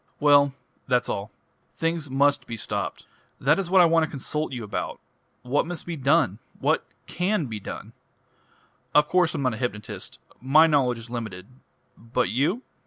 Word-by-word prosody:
"Well 145 -2 +5 0.3
that's 125 -2 +1
all. 100 +1 -3 0.5
Things 165 -3 -1
must 140 +2 +2
be 115 - -5
stopped. - - -4 0.3
That 150 +7 +3
is 185 -3 -2
what 190 0 +6
I - - +7
want 165 0 +4
to 155 - -1
consult 150 +3 -3
you 125 -3 -5
about. 105 - -4 0.4
What 135 +6 +1
must 175 -1 -6
be 170 - -4
done? 135 - +2 0.2
What - - +2 0.2
can 180 -1 0
be 110 -4 -5
done? - - -8 1.0
Of 150 0 +6
course 180 -2 +2
I'm 145 - -2
not 125 -3 +1
a - - -5
hypnotist; 115 -4 -5 0.2
my 145 +5 +6
knowledge 135 -6 +2
is 115 +1 -10
limited. 110 -7 -5 0.5
But 115 +1 -1
you 150 - 0
140 Hz, 170 wpm, -25 LUFS, 120-165 Hz, 1.0 s, I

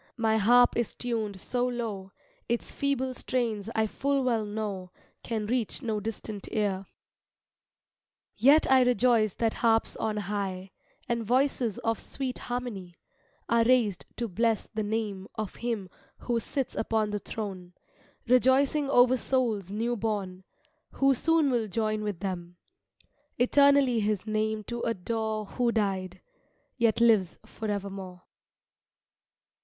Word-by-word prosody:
my 220 -2 +2
harp 240 +4 +5
is 235 -2 -1
tuned 220 -5 -3
so 245 +5 -1
low, 220 -6 -4 0.4
Its 235 0 -1
feeble 265 -2 -1
strains 230 -5 -2
I 220 -1 +3
full 275 +5 0
well 235 -4 +1
know 205 -3 -4 0.3
Can 220 -2 -3
reach 235 0 -1
no 220 -3 -1
distant 215 -1 -6
ear. 195 -3 -1 1.5
Yet 285 +5 +5
I 260 -1 +7
rejoice 240 -4 +3
that 225 -1 0
harps 225 -1 +2
on 220 -1 -2
high, 195 -2 -3 0.4
And 235 -2 -1
voices 250 -2 +1
of 225 -1 0
sweet 260 -2 -5
harmony, 215 -9 -5 0.5
Are 235 0 +3
raised 230 -6 +2
to 235 - -2
bless 225 +2 0
the 220 - -1
name 205 -2 -3
Of 215 -4 -5
Him 230 -5 -3 0.3
who 240 -1 -1
sits 270 +3 -3
upon 220 -1 0
the 205 - -2
throne, 190 -5 -6 0.5
Rejoicing 265 +3 +3
over 250 -1 +5
souls 230 -8 0
new 230 +4 -1
born, 200 -4 -3 0.5
Who 275 0 +3
soon 315 +1 +2
will 235 -3 0
join 215 0 -1
with 205 -4 -4
them, 175 -3 -5 0.8
Eternally 275 -1 +4
His 210 -2 -1
name 215 0 -1
to 235 +2 -5
adore 220 +1 -2
Who 240 +3 0
died, 190 -4 -2 0.5
yet 230 -3 +2
lives 215 -6 +4
forevermore. 195 -4 -5
220 Hz, 130 wpm, -28 LUFS, 205-245 Hz, 1.5 s, I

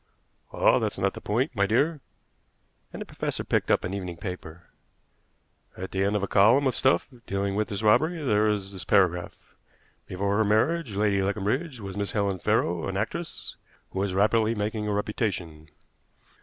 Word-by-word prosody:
"Ah! - - +4
that's - - -2
not - - 0
the - - -9
point, 125 +6 -1
my 100 -1 +2
dear," 145 +8 +1 0.9
and - - -8
the - - -5
professor - - -4
picked - - 0
up - - +3
an 90 - -3
evening 90 -3 -5
paper. 90 -2 -7 1.1
"At 95 +1 -6
the 95 0 0
end 100 +1 +1
of 100 - 0
a - - 0
column 115 +9 +5
of 130 - +1
stuff 135 - +2 0.2
dealing 100 0 -1
with 105 +1 0
this 100 +1 -4
robbery 155 +11 +4
there 105 -5 +3
is 100 -2 -2
this 95 -1 -6
paragraph: 90 -3 +1 0.5
'Before 100 +2 -1
her 110 - +4
marriage 110 +4 +1
Lady 100 -1 +2
Leconbridge 110 - -1
was 95 -1 -6
Miss 100 -1 -2
Helen 100 -3 0
Farrow, 85 0 +1
an 95 0 -3
actress, 165 - -4 0.4
who 95 - -4
was 95 -1 -1
rapidly 110 +3 +3
making 105 +1 -2
a - - 0
reputation. 95 -7 -3
100 Hz, 175 wpm, -26 LUFS, 95-110 Hz, 1.1 s, column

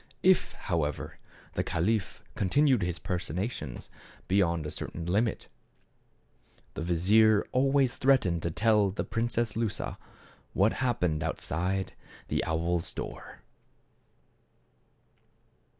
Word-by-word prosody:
If, 185 0 +4
however, 80 -6 -3 0.3
the - - 0
caliph 105 +4 -1
continued 130 +5 +3
his 90 -1 -1
personations 90 - -4 0.4
beyond 85 -5 +2
a 75 - -4
certain 85 +1 -6
limit 105 +6 0 1.3
the - - -5
vizier 100 +6 +4
always 135 0 +2
threatened 125 -11 +3
to 85 - -1
tell 105 +3 +3
the 95 - -3
Princess 115 -1 -1
Lusa 115 -2 -2 0.5
what 100 +3 +3
happened 90 -11 +1
outside 90 +4 -2 0.4
the - - 0
owl's 85 +1 -1
door. - - -7
95 Hz, 100 wpm, -29 LUFS, 85-115 Hz, 1.3 s, If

